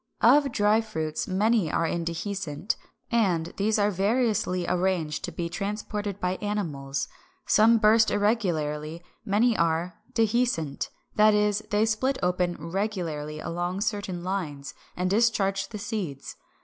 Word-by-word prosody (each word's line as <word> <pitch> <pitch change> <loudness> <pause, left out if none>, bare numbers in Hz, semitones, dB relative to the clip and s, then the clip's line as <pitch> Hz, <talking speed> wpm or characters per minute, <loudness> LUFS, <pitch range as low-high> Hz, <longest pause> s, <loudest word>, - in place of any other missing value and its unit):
Of 275 +4 +5
dry 210 0 +3
fruits 160 -8 -3
many 200 -2 +2
are 165 - +1
indehiscent; 170 +1 -2 0.4
and 180 -8 +1
these 215 +2 +2
are 205 0 +2
variously 200 -2 +1
arranged 180 -4 0
to 180 - -6
be 170 +1 -3
transported 205 +1 -4
by 180 0 -1
animals. 155 -10 -3 0.4
Some 230 +2 +5
burst 220 0 +5
irregularly; 170 -7 0 0.2
many 220 +4 +2
are 170 +3 0
Dehiscent, 225 - 0 0.3
that 215 0 +6
is, 210 0 +2
they 210 +1 +3
split 255 +5 0
open 180 -1 +1
regularly 165 -7 -3
along 175 +3 -3
certain 200 -5 -2
lines, 160 -7 -4 0.2
and 180 +1 0
discharge 195 -2 +2
the 215 - -6
seeds. 190 -10 -5
195 Hz, 125 wpm, -27 LUFS, 170-215 Hz, 0.4 s, that